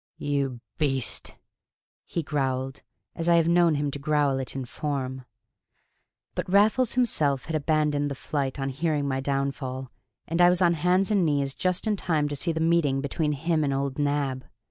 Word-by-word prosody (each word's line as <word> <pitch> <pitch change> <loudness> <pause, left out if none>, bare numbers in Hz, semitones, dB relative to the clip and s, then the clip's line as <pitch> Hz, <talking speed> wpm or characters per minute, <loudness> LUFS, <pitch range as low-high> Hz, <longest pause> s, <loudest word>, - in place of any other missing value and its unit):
"You 140 -4 -2 0.2
beast!" 135 -5 -1 0.7
he 170 - -2
growled, 135 -2 -2 0.3
as 165 +1 -1
I 170 - +6
have 165 -1 +3
known 170 -2 +4
him 145 0 -1
growl 145 -1 +1
it 130 - -5
in 135 -1 -3
form. 130 -1 -4 1.1
But - - -4
Raffles 220 +5 +4
himself 150 - +1
had 160 - -3
abandoned 150 -1 +1
the 140 - -4
flight 140 0 -3
on 135 0 -1
hearing 145 +1 -1
my 135 -1 -1
downfall, 135 -2 -3 0.4
and 165 +2 0
I 175 - +8
was 180 0 +2
on 175 -2 +4
hands 180 +5 +2
and 200 -3 +3
knees 140 -3 +1
just 185 +5 -1
in 215 -2 +1
time 155 -5 0
to 145 - -3
see 165 +5 0
the 160 - -2
meeting 160 -4 +2
between 150 +2 -1
him 160 +2 0
and 140 - 0
old 135 0 -2
Nab. 140 -3 0
145 Hz, 175 wpm, -26 LUFS, 135-165 Hz, 1.1 s, I